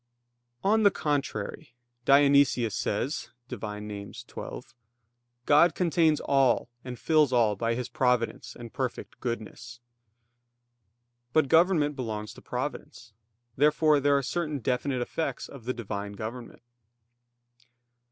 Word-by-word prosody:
On 215 +3 +3
the 205 - +7
contrary, 140 - -3 0.3
Dionysius 140 -5 +4
says 130 +10 -2 0.2
(Div. 125 -5 -7
Nom. 105 -1 -6
xii): - - -12 1.1
"God 150 +4 +5
contains 165 -3 +2
all 135 -3 +2
and 125 -1 -7
fills 155 -2 +3
all 115 -4 +3
by 115 +3 -1
His 125 0 -3
providence 125 -2 0
and 120 -1 -10
perfect 130 -3 -4
goodness." 120 0 -6 1.5
But 155 -4 +3
government 160 -3 +4
belongs 110 -5 -4
to - - -14
providence. 120 -3 -6 0.4
Therefore 150 +1 +4
there 140 0 +3
are 140 - -1
certain 155 +1 -2
definite 125 +1 -1
effects 140 0 -3
of 135 -5 -12
the 130 - 0
Divine 100 -3 -5
government. 115 +4 -7
130 Hz, 115 wpm, -28 LUFS, 115-145 Hz, 1.5 s, the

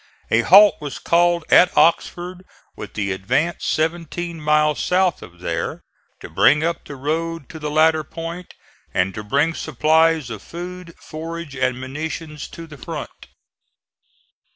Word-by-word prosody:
A 115 - +4
halt 200 - +7
was 145 -3 -5
called 170 -1 +2
at 180 - +6
Oxford 175 +2 +1 0.3
with 105 -1 -9
the 100 -2 -1
advance 130 - -1
seventeen 165 +1 -2
miles 150 0 +2
south 180 -2 +1
of 90 0 -13
there, - - -3 0.4
to - - -8
bring 150 +2 +4
up 170 +1 -2
the 145 - -8
road 160 +2 -3
to 160 - -9
the 150 -1 -4
latter 155 +1 +3
point 165 +4 -8 0.4
and 95 +1 +1
to 105 - -6
bring 140 +9 +1
supplies 155 -1 +2
of 110 -3 -6
food, 175 - -8
forage 165 -1 -7
and 130 -1 0
munitions 150 +3 -6
to 165 - -10
the 150 -4 -13
front. - - -8
160 Hz, 145 wpm, -21 LUFS, 140-170 Hz, 0.4 s, halt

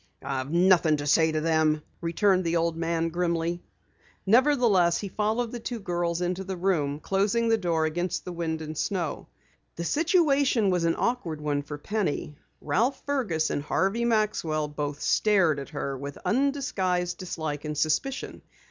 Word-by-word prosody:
"I've 135 -1 -3
nothing 170 -2 +4
to 145 - -4
say 160 +2 +4
to 155 0 -1
them," 155 -1 +2 0.2
returned 185 +3 +2
the 170 0 0
old 165 0 0
man 165 0 -1
grimly. 170 0 -1 0.6
Nevertheless, 225 -7 +4
he 200 - -5
followed 220 +4 -1
the 240 - -5
two 235 +1 -5
girls 175 -3 -2
into 180 +2 -1
the 190 -1 -5
room, 155 -6 0
closing 205 +7 +1
the 225 - +4
door 165 -4 +1
against 175 +3 -2
the 180 - -5
wind 160 -2 -3
and 155 0 -6
snow. 175 -1 -2 0.5
The 170 - -4
situation 285 - +2
was 175 -2 +1
an 165 - +2
awkward 185 -11 -1
one 145 -1 -1
for 145 +1 -7
Penny. 180 -4 -2 0.3
Ralph 230 - 0
Fergus 220 - 0
and - - -1
Harvey 195 +9 0
Maxwell 210 -9 0
both 145 -1 -4
stared 190 -9 +3
at 140 - -7
her 140 -2 -4
with 140 +1 -7
undisguised 200 -10 0
dislike 155 -5 -4
and 150 -1 -4
suspicion. 210 - -1
175 Hz, 160 wpm, -27 LUFS, 155-210 Hz, 0.6 s, nothing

